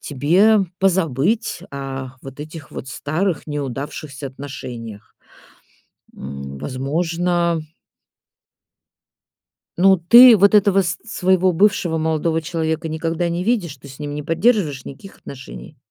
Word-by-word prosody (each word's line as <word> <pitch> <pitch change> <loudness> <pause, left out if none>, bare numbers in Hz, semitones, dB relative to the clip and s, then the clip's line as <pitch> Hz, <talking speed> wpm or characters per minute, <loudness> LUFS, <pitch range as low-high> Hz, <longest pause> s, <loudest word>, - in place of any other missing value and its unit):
тебе 180 +10 +3 0.2
позабыть 190 - 0
о 135 -2 -6
вот 135 0 -11
этих 155 0 -9
вот 130 - -8
старых, 160 +6 -2
неудавшихся 140 0 -5
отношениях. 120 -6 -9 1.0
М, 70 0 -8
возможно 170 - -1 2.2
Ну, 190 +1 +6
ты 235 +8 +8
вот 200 +2 +4
этого 200 -1 +4
с 175 -1 -2
своего 185 -3 +2
бывшего 175 -3 +1
молодого 160 +1 0
человека 160 0 -2
никогда 165 +2 -2
не 175 +2 -2
видишь, 185 - -1
ты 140 - -14
с 135 +2 -13
ним 145 0 -5
не 150 - -5
поддерживаешь 165 - +1
никаких 195 +8 -11
отношений? 135 +2 -11
160 Hz, 115 wpm, -20 LUFS, 140-185 Hz, 2.2 s, ты